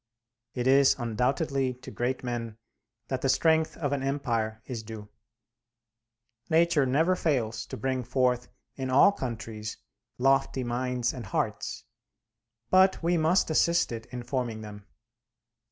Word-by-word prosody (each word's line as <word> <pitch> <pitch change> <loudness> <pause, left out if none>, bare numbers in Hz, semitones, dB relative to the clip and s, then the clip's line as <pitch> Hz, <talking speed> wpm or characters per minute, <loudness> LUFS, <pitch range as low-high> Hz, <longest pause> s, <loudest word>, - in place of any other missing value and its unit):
It 125 -1 -2
is 135 +1 +5
undoubtedly 130 +3 0
to 130 +1 -11
great 125 +2 -2
men 115 -3 -4 0.5
that 130 -1 -2
the 135 - +1
strength 160 +3 +2
of 145 -3 -1
an 140 - -1
empire 115 -6 -2
is 120 -4 -5
due. 110 -1 -9 1.4
Nature 160 -3 +3
never 160 +8 +3
fails 115 -10 -1
to - - -6
bring 130 +2 -1
forth 125 0 +1 0.3
in 130 -1 -4
all 135 +9 +6
countries 115 - -5 0.4
lofty 135 0 +2
minds 125 0 -1
and 120 -5 -7
hearts; - - -2 0.9
but 185 -1 +4
we 175 +1 +2
must 165 +1 +2
assist 170 0 +3
it 115 -1 -6
in 125 -1 -7
forming 120 -4 -3
them. 105 -1 -10
130 Hz, 135 wpm, -28 LUFS, 115-140 Hz, 1.4 s, all